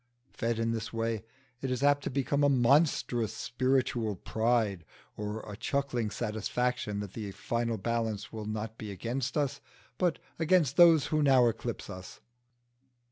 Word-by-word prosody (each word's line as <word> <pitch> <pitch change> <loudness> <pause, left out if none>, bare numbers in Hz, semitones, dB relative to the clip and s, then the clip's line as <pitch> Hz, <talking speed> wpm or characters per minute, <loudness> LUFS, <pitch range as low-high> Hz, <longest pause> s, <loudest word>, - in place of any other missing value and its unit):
Fed 115 0 -1
in 115 0 0
this 115 -1 -3
way 115 -1 -2 0.4
it 135 - -2
is 125 +1 -1
apt 145 0 +4
to - - -2
become 140 +2 0
a 145 - +5
monstrous 125 -4 +3
spiritual 120 -3 0
pride, 110 -2 0 0.3
or 105 +1 -4
a 105 - -8
chuckling 125 -1 -1
satisfaction 110 -1 -2
that 100 -2 -7
the 105 -3 -5
final 115 +1 -2
balance 110 0 -2
will 110 -1 -5
not 110 +1 -4
be 110 - -6
against 120 - -3
us 140 -1 -1 0.4
but 175 -5 +2 0.2
against 160 -4 +3
those 165 -5 +7
who 155 - +3
now 135 -4 +5
eclipse 115 +1 -3
us. 95 -2 -9
115 Hz, 150 wpm, -30 LUFS, 110-135 Hz, 0.4 s, those